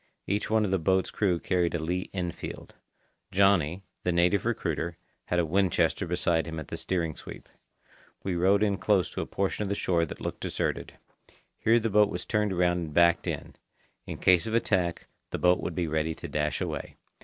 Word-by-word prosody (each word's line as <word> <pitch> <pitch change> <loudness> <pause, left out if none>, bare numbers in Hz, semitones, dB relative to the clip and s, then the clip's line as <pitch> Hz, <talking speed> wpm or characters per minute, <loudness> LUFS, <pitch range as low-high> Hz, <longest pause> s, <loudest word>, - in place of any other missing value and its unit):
Each 100 +2 -1
one 110 -1 +3
of 95 - -2
the 95 - +2
boat's 95 +3 +1
crew 90 -5 +1
carried 90 -1 0
a - - +2
Lee 90 +3 -2
Enfield. 90 -3 -5 0.6
"Johnny," 95 -2 +3 0.2
the 90 - 0
native 90 +4 +2
recruiter, 85 -6 -2 0.3
had 90 - -1
a 85 - +3
Winchester 90 +1 +1
beside 85 -1 +1
him 80 -1 -5
at 75 - -8
the - - -4
steering 85 -4 -2
sweep. - - -10 0.8
We 95 -2 -1
rowed 95 +4 +3
in 100 -2 +1
close 95 -2 +2
to - - -3
a - - -4
portion 100 +1 -1
of 105 - -1
the 100 - 0
shore 85 -4 +1
that - - -8
looked - - -4
deserted. - - -2 0.7
Here 115 +2 +4
the 115 -1 -1
boat 105 0 +5
was 90 -2 -4
turned 105 -2 +1
around 90 -1 +2
and 80 -3 -5
backed 85 -1 +4
in; - - -4 0.5
in - - -5
case 90 0 +4
of 110 - -1
attack, 90 -7 +1 0.2
the - - -3
boat 90 0 +4
would 85 - -4
be 90 - 0
ready 80 +1 -1
to - - -7
dash 75 0 -1
away. - - -4
90 Hz, 200 wpm, -28 LUFS, 85-100 Hz, 0.8 s, boat